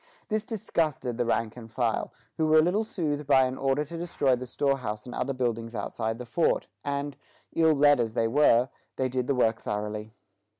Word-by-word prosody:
This 215 0 -1
disgusted 155 - -1
the 120 - +1
rank 115 -1 0
and 115 -2 -11
file, 115 -2 -1 0.3
who 160 - +2
were 155 0 +5
a - - +8
little 190 +6 +2
soothed 150 -9 -3
by 135 -2 +6
an 130 0 -1
order 135 +2 0
to 170 +3 -7
destroy 145 -6 +1
the 125 +1 -7
storehouse 125 -6 -1
and 125 - -8
other 135 - -1
buildings 115 -3 -2
outside 110 +2 -3
the 125 - -7
fort; 160 +8 +1 0.2
and, 140 0 -2 0.4
ill 160 -1 +4
led 145 -1 +5
as 115 -1 -1
they 115 - +2
were, 125 -1 +4 0.3
they 130 -1 0
did 125 0 -2
the 140 - +1
work 115 -2 +2
thoroughly. 105 +1 -4
130 Hz, 200 wpm, -28 LUFS, 115-150 Hz, 0.4 s, a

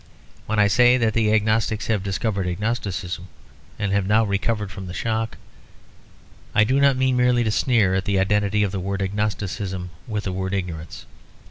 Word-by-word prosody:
When 110 - -1
I 105 - +5
say 125 +5 +5
that 115 -3 +1
the 110 -2 +2
agnostics 110 0 +1
have 110 -3 0
discovered 95 0 -2
agnosticism, 95 -2 -3 0.5
and 105 -2 -1
have 100 -1 +1
now 110 +2 +4
recovered 105 0 -1
from 95 -2 -8
the 90 - -7
shock, 110 -1 -2 1.2
I 105 - +6
do 130 +5 +2
not 140 -2 +4
mean 130 0 +2
merely 125 -1 +3
to 110 - 0
sneer 110 -5 +2
at 95 0 0
the 100 -1 +1
identity 105 +2 +2
of 100 - -1
the 95 - -3
word 100 +1 -2
agnosticism 95 -2 -3 0.2
with 105 -2 -3
the 95 - -3
word 95 +1 -2
ignorance. 85 -4 -5
105 Hz, 175 wpm, -23 LUFS, 95-110 Hz, 1.2 s, I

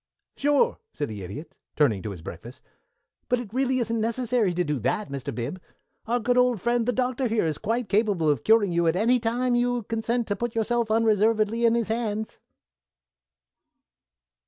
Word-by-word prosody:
"Sure," 290 - +2
said 145 - -3
the 105 -2 -7
Idiot, 100 - -8 0.2
turning 115 -10 +2
to 105 - -5
his 90 -5 -8
breakfast, - - -10 0.7
"but 250 - +3
it 230 -4 -7
really 260 0 +1
isn't 230 -2 -1
necessary 230 -2 0
to 175 +1 0
do 150 -4 -2
that, 210 - -1
Mr. 140 -2 -5
Bib. 130 +10 -4 0.5
Our 240 +2 +1
good 245 +2 +2
old 250 -3 +3
friend, 235 +3 0
the - - +3
Doctor 255 +1 0
here, 225 -5 +1
is 155 -2 -2
quite 230 +1 -1
capable 200 -6 +1
of 145 -6 +1
curing 220 -4 +4
you 170 0 +1
at 165 - +2
any 235 +6 +3
time 245 +2 0
you 245 0 +1
consent 230 +2 -1
to 205 - +1
put 240 +1 -4
yourself 230 0 0
unreservedly 220 +1 +2
in 230 - +3
his 230 -2 -1
hands." 220 -1 -3
225 Hz, 180 wpm, -25 LUFS, 185-240 Hz, 0.7 s, curing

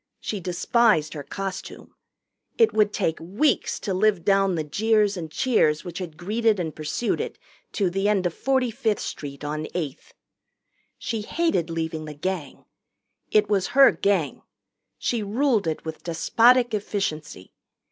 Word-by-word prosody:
She 210 - -4
despised 180 -1 +2
her 150 - -5
costume. 195 +7 -7 0.6
It 455 -2 +4
would 210 -1 +3
take 165 -6 -1
weeks 200 - 0
to 195 - -2
live 195 -2 +2
down 195 -2 +3
the 160 - -1
jeers 210 +6 +2
and 165 -3 -5
cheers 155 -6 +1
which 175 0 -6
had 165 -4 -7
greeted 215 +3 +1
and 160 -3 -3
pursued 155 +10 -2
it - - -5 0.4
to 200 - +1
the 195 +3 0
end 195 -3 +1
of 175 - 0
45th 250 -4 0
Street 140 -1 -6
on 155 +1 -3
Eighth. 155 -5 -5 0.8
She 225 -2 -3
hated 270 - 0
leaving 160 -1 -3
the 150 -1 -8
Gang. 165 -2 -4 0.6
It 210 -1 +3
was 195 -3 +1
her 275 -1 +9
Gang. 195 -7 0 0.6
She 235 -2 -1
ruled 220 - +1
it 160 0 -3
with 160 0 -7
despotic 235 +8 +3
efficiency. 155 - -3
195 Hz, 145 wpm, -24 LUFS, 160-215 Hz, 0.8 s, her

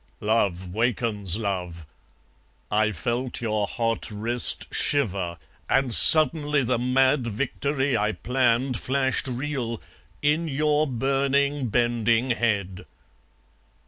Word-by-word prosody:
Love 100 -4 0
wakens 110 -4 +1
love! 90 -6 -4 0.9
I 110 +1 +1
felt 120 +6 -3
your 110 -3 -2
hot 115 0 -2
wrist 115 +3 -2
shiver 95 - -1 0.3
And 135 -3 +1
suddenly 150 -1 +6
the 125 0 -1
mad 130 +1 +1
victory 135 +3 -2
I 105 -1 0
planned 125 0 0
Flashed 130 0 0
real, 125 -3 -4 0.4
in 155 +3 +1
your 150 +1 0
burning 140 +2 0
bending 120 +1 +1
head. 100 -6 -2
120 Hz, 100 wpm, -24 LUFS, 110-135 Hz, 0.9 s, suddenly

